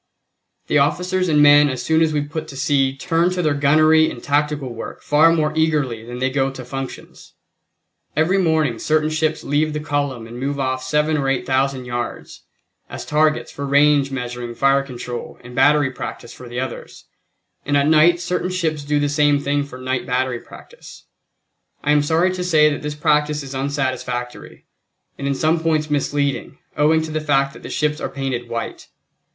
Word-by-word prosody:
The 150 Hz, -, +2 dB
officers 180 Hz, +6 st, 0 dB
and 150 Hz, -2 st, +4 dB
men 145 Hz, 0 st, +7 dB
as 130 Hz, -2 st, -4 dB
soon 160 Hz, 0 st, +2 dB
as 160 Hz, -1 st, +3 dB
we 150 Hz, -1 st, 0 dB
put 155 Hz, +2 st, -6 dB
to 135 Hz, -, -9 dB
sea 135 Hz, -1 st, +1 dB
turn 165 Hz, +5 st, +1 dB
to 180 Hz, -1 st, -2 dB
their 155 Hz, -2 st, +2 dB
gunnery 155 Hz, +2 st, +4 dB
and 120 Hz, -, -9 dB
tactical 145 Hz, -3 st, -1 dB
work 115 Hz, -, -8 dB
far 155 Hz, +3 st, +5 dB
more 155 Hz, -2 st, +1 dB
eagerly 150 Hz, -8 st, 0 dB
than 120 Hz, +1 st, -8 dB
they 130 Hz, +1 st, -1 dB
go 135 Hz, 0 st, +1 dB
to 130 Hz, -2 st, -9 dB
functions. 135 Hz, +1 st, -8 dB, 0.8 s
Every 165 Hz, +6 st, +2 dB
morning 155 Hz, -9 st, +1 dB
certain 155 Hz, 0 st, +1 dB
ships 155 Hz, 0 st, -1 dB
leave 150 Hz, +2 st, 0 dB
the 150 Hz, -, -2 dB
column 145 Hz, -5 st, -2 dB
and 120 Hz, +2 st, -9 dB
move 140 Hz, +2 st, -3 dB
off 130 Hz, -1 st, -1 dB
seven 150 Hz, +4 st, +1 dB
or 135 Hz, -2 st, 0 dB
eight 135 Hz, -2 st, -1 dB
thousand 135 Hz, -1 st, 0 dB
yards 120 Hz, 0 st, -5 dB, 0.5 s
as -, -, -7 dB
targets 155 Hz, 0 st, +1 dB
for 140 Hz, -, -7 dB
range 140 Hz, 0 st, +3 dB
measuring 125 Hz, -2 st, -5 dB
fire 135 Hz, +1 st, +3 dB
control 125 Hz, -2 st, -7 dB
and 125 Hz, 0 st, -11 dB
battery 145 Hz, +1 st, +3 dB
practice 120 Hz, -2 st, -7 dB
for 125 Hz, -, -11 dB
the 120 Hz, +1 st, -4 dB
others, 130 Hz, -2 st, -7 dB, 0.6 s
and 145 Hz, 0 st, +1 dB
at 140 Hz, -, +2 dB
night 160 Hz, +3 st, +5 dB
certain 180 Hz, +1 st, -2 dB
ships 160 Hz, -5 st, -2 dB
do 145 Hz, +1 st, 0 dB
the 145 Hz, -, +1 dB
same 145 Hz, 0 st, +2 dB
thing 145 Hz, 0 st, 0 dB
for 140 Hz, -3 st, -10 dB
night 130 Hz, 0 st, -3 dB
battery 125 Hz, -1 st, -1 dB
practice. -, -, -14 dB, 0.8 s
I 150 Hz, -, +2 dB
am 150 Hz, 0 st, +4 dB
sorry 165 Hz, +5 st, +1 dB
to 180 Hz, -1 st, -3 dB
say 155 Hz, -4 st, +4 dB
that 145 Hz, -, -4 dB
this 150 Hz, 0 st, -4 dB
practice 150 Hz, -1 st, +1 dB
is 135 Hz, 0 st, -8 dB
unsatisfactory, 130 Hz, -3 st, -4 dB, 0.5 s
and 140 Hz, -, -3 dB
in 140 Hz, -, 0 dB
some 160 Hz, +4 st, +1 dB
points 155 Hz, -2 st, 0 dB
misleading, 145 Hz, -1 st, -1 dB, 0.2 s
owing 155 Hz, +2 st, +3 dB
to 160 Hz, -, -6 dB
the 155 Hz, 0 st, -2 dB
fact 140 Hz, -2 st, +1 dB
that -, -, -13 dB
the -, -, -8 dB
ships 150 Hz, 0 st, -1 dB
are -, -, -3 dB
painted 130 Hz, -3 st, -4 dB
white. 115 Hz, -1 st, -5 dB
145 Hz, 190 wpm, -20 LUFS, 130-155 Hz, 0.8 s, men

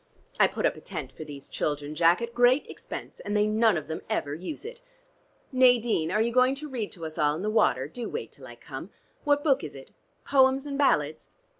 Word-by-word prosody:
I -, -, +7 dB
put -, -, -3 dB
up -, -, +2 dB
a -, -, -12 dB
tent 160 Hz, -9 st, -6 dB
for -, -, -9 dB
these 145 Hz, -2 st, -10 dB
children, 145 Hz, 0 st, -3 dB
Jack, 170 Hz, +6 st, +4 dB
at 235 Hz, 0 st, -5 dB
great 245 Hz, +3 st, +4 dB
expense, -, -, -8 dB
and 205 Hz, 0 st, -2 dB
they 210 Hz, -, +3 dB
none 215 Hz, -2 st, +3 dB
of 155 Hz, -, -5 dB
them 160 Hz, 0 st, -4 dB
ever 145 Hz, -, -1 dB
use 185 Hz, -, -7 dB
it. 475 Hz, +1 st, -8 dB, 0.7 s
Nadine, 240 Hz, -, +3 dB
are 215 Hz, +3 st, +2 dB
you 235 Hz, -, 0 dB
going 255 Hz, +2 st, +4 dB
to 300 Hz, +2 st, -6 dB
read 240 Hz, -7 st, -4 dB
to 165 Hz, -4 st, -7 dB
us 155 Hz, 0 st, -7 dB
all 150 Hz, 0 st, +3 dB
in 170 Hz, -, -5 dB
the 215 Hz, -, 0 dB
water? 135 Hz, -, +2 dB
Do 235 Hz, +9 st, -6 dB
wait 465 Hz, -, -5 dB
till -, -, -12 dB
I -, -, -11 dB
come. -, -, -9 dB, 0.4 s
What 290 Hz, 0 st, +3 dB
book 280 Hz, -, +3 dB
is 150 Hz, -, -7 dB
it? 135 Hz, -, -12 dB, 0.3 s
'Poems 265 Hz, 0 st, +4 dB
and 285 Hz, -1 st, -4 dB
Ballads?' 155 Hz, -, +1 dB
215 Hz, 230 wpm, -27 LUFS, 155-260 Hz, 0.7 s, I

